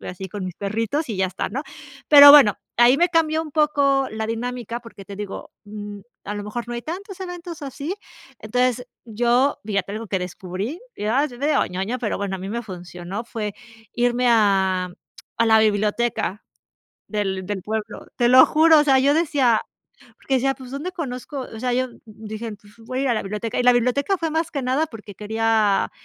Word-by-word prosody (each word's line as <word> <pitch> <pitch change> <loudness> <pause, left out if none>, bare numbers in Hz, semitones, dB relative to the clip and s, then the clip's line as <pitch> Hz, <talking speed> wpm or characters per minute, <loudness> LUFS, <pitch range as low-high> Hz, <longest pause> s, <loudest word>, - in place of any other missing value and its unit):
así 190 +1 -7
con 200 +1 -6
mis 185 -2 -5
perritos 225 - -2
y 215 - -3
ya 190 0 +1
está, 185 - -4
¿no?," 270 +7 -3 0.5
Pero 285 -1 +11
bueno, 280 -9 +8 0.2
ahí 240 +2 +6
me 350 +4 +3
cambió 320 -2 +1
un 315 - -9
poco 280 -3 +2
la 220 0 -3
dinámica 235 0 -4
porque 230 -4 -13
te 200 +1 -9
digo, 205 -1 -7
mm, 205 -1 -8 0.2
a 205 - -4
lo 205 0 -5
mejor 235 +3 -5
no 240 - -4
hay 235 - -5
tantos 380 - -7
eventos 350 -3 -7
así. 285 +5 -5 0.5
Entonces 250 +2 0 0.2
yo 240 +4 +1
fíjate 200 -2 -2
algo 220 +2 -5
que 190 -1 -1
descubrí 185 - -5 0.2
y - - -5
ah, 255 +6 +2
después 250 -4 -5
te 285 - +1
digo, 300 - +2
ñoña 195 +7 -3
pero 225 -4 -2
bueno, 200 -1 -3
a - - -10
mí 190 +1 -6
me 235 +3 -3
funcionó 180 +1 -7
fue 215 -3 -5 0.4
irme 245 +1 +1
a 190 -5 +2 0.5
a 230 - +3
la 220 0 +6
biblioteca 215 0 0 0.6
del 195 -3 -2
del 200 0 -4
pueblo 215 0 -5
te 240 -1 +3
lo 255 +1 +9
juro, 315 0 +5
o - - +4
sea, 270 -3 +4
yo 280 +2 +3
decía 280 -8 +2 0.6
porque 270 - -3
decía: 270 +1 +2
"Pues 260 -2 -12
dónde 290 +7 -4
conozco" 275 -3 -5
o 220 - -8
sea, 250 0 -1
yo 255 +1 0 0.2
dije: 220 +1 -7
"Pues 205 +1 -21
voy 240 +3 -6
a - - 0
ir 275 - 0
a 240 - +2
la 215 - -1
biblioteca" 210 +3 -4
y - - +2
la 250 - +7
biblioteca 250 +10 +1
fue 325 -1 -2
más 320 +1 -1
que 280 -3 -3
nada 265 +5 +1
porque 215 -6 -11
quería 220 -1 +1
235 Hz, 205 wpm, -22 LUFS, 205-275 Hz, 0.6 s, Pero